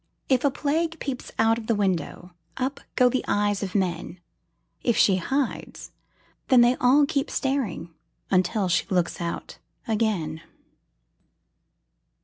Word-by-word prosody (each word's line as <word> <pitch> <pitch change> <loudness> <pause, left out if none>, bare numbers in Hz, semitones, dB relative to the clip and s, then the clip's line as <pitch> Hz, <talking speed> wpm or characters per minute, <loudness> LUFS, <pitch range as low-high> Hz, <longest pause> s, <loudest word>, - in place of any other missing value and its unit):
If 255 -2 +3
a 285 - +4
Plague 315 +4 -1
peeps 265 -3 -5
out 225 +1 +3
of 220 - -10
the 230 - +2
window, 185 -2 -2 0.3
Up 265 +2 -2 0.2
go 250 - +5
the 250 +1 0
eyes 205 -1 +1
of 195 -1 -5
men; 180 -2 -2 0.6
If 235 - +1
she 190 -2 +5
hides, 265 +8 -3 0.6
then 255 -2 +6
they 240 +1 +5
all 270 +4 +5
keep 280 -2 -1
staring 250 -11 -2 0.4
Until 185 +2 +2
she 170 -2 +1
looks 180 -2 0
out 170 0 -5 0.3
again. 205 -9 -1
225 Hz, 130 wpm, -25 LUFS, 185-265 Hz, 0.6 s, then